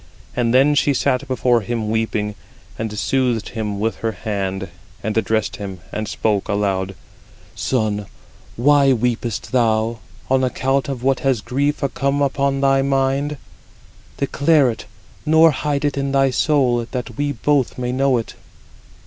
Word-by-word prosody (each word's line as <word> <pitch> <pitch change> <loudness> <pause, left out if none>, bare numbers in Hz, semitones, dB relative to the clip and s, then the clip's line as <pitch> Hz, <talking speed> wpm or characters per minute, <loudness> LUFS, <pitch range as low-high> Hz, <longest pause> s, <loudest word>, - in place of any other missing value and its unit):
And 120 -2 +1
then 135 +4 +5
she 145 -1 +2
sat 125 0 0
before 125 -2 +2
him 110 0 -2
weeping, 110 -2 -1 0.4
and 110 -1 -4
soothed 125 -2 0
him 105 -3 -3
with 110 +2 -1
her 115 -1 -2
hand, 95 -2 -3 0.3
and 110 - -2
addressed 110 -1 0
him, 95 -3 -6
and 110 0 -3
spoke 105 0 -1
aloud: 95 -2 -1 0.6
"Son, 105 -5 -1 0.5
why 140 +2 +4
weepest 120 -2 -2
thou—on 115 +2 0
account 135 +2 0
of 130 -3 -4
what 135 0 +2
has 135 -4 +1
grief 145 +5 -1
come 140 +1 0
upon 140 -1 +1
thy 135 0 +4
mind? 135 +2 0 0.8
Declare 140 -1 +3
it, 115 - -9 0.4
nor 160 +1 +6
hide 145 0 -1
it 145 - 0
in 140 0 -1
thy 135 -1 +3
soul, 125 -5 +2
that 125 -3 -5
we 145 +2 -1
both 140 +1 +1
may 125 -1 -2
know 135 0 +2
it." 115 - -4
125 Hz, 145 wpm, -20 LUFS, 110-140 Hz, 0.8 s, nor